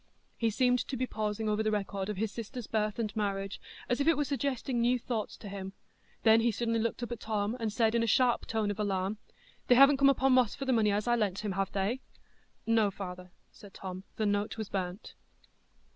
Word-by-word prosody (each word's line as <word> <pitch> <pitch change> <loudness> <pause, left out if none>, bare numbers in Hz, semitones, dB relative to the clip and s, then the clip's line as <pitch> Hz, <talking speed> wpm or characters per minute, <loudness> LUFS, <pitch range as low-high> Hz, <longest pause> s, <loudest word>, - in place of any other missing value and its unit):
He 230 - +1
seemed 250 +3 +2
to 265 - -3
be 255 - 0
pausing 215 -2 -3
over 210 0 +1
the 215 - +1
record 200 -2 -2
of 210 - -3
his 215 +1 -1
sister's 235 +2 -6
birth 215 -1 -1
and 215 -3 -3
marriage, 195 -2 -2 0.3
as 245 +3 0
if 280 - 0
it 330 -3 +5
were 295 - +2
suggesting 270 -3 -1
new 245 +2 +3
thoughts 230 -3 -4
to 210 - -10
him; 195 -1 -6 0.5
then 225 0 +6
he 235 - +3
suddenly 230 +1 0
looked 230 +2 -2
up 240 - -5
at 240 - -4
Tom, 215 0 -1
and 225 -2 -1
said, 220 0 +2
in 235 - +2
a 230 - +1
sharp 245 +2 +3
tone 220 -2 0
of 205 - -6
alarm: 200 0 -1 0.5
"They 245 - +6
haven't 275 +2 +7
come 275 0 +6
upo' 270 0 +3
Moss 255 -4 +4
for 275 - -5
the 260 - +2
money 215 -3 +3
as 205 +3 -1
I 240 - +4
lent 210 -3 -1
him, 205 - -1
have 195 0 -1
they?" 205 +7 -1 0.6
"No, 225 -2 +3
father," 180 -2 -7 0.2
said 200 -2 -15
Tom; 185 -1 -7
"the 215 - -1
note 205 +1 0
was 220 -2 -4
burnt." 185 0 -4
220 Hz, 225 wpm, -31 LUFS, 205-240 Hz, 0.6 s, haven't